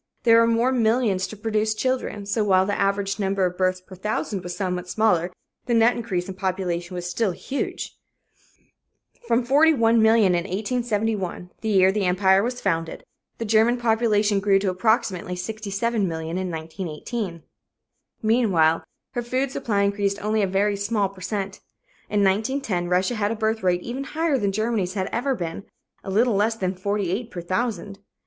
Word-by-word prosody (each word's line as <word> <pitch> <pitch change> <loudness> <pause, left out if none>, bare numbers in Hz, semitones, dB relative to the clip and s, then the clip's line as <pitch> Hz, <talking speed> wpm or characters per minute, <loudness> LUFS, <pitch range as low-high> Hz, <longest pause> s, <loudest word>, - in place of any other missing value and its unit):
There 230 -1 +6
were 230 - +4
more 230 +2 +2
millions 225 -5 +1
to 215 - -9
produce 215 0 0
children, 250 -3 -2
so 210 +2 0
while 190 -2 +4
the 205 - -1
average 200 0 0
number 195 -1 +1
of 180 0 -2
births 185 0 0
per 185 - -15
thousand 205 0 -2
was 175 0 -6
somewhat 180 -2 -3
smaller, 180 -5 +2 0.4
the 240 - +2
net 230 +2 +4
increase 190 -7 -3
in 190 - -5
population 185 -2 -3
was 175 0 -4
still 200 +4 0
huge. 275 +9 -4 1.3
From 235 +1 +2
41,000,000 300 +5 +5 0.5
in 185 - +3
1871, 205 0 -2
the 220 - -2
year 190 -2 +5
the 200 -1 -1
Empire 190 +1 +4
was 245 +3 -2
founded, 165 -4 -2 0.3
the 230 - -4
German 225 +3 +3
population 220 -3 +2
grew 195 0 +3
to 195 -1 0
approximately 185 -3 0
67,000,000 195 -4 -2
in 185 -1 -3
1918. 165 +3 -5 0.8
Meanwhile 195 -9 +3 0.3
her 245 - -1
food 255 +3 -1
supply 205 -6 0
increased 200 0 0
only 215 +1 +1
a 195 - +2
very 200 +2 +1
small 200 -1 0
per 195 -1 -15
cent. 195 0 -3 0.5
In 205 -1 +2
1910, 205 -2 0
Russia 185 +6 +2
had 210 -3 0
a 225 - -2
birth 220 0 -1
rate 180 -1 +1
even 260 +3 -4
higher 315 -2 0
than 200 -2 0
Germany's 215 -3 -1
had 190 -1 -1
ever 260 +3 0
been 170 0 -5 0.4
a - - -7
little 225 +5 +3
less 210 +3 +2
than 185 -4 -2
48 200 +3 -2
per 175 - -6
thousand. 200 +1 -3
200 Hz, 165 wpm, -24 LUFS, 185-225 Hz, 1.3 s, There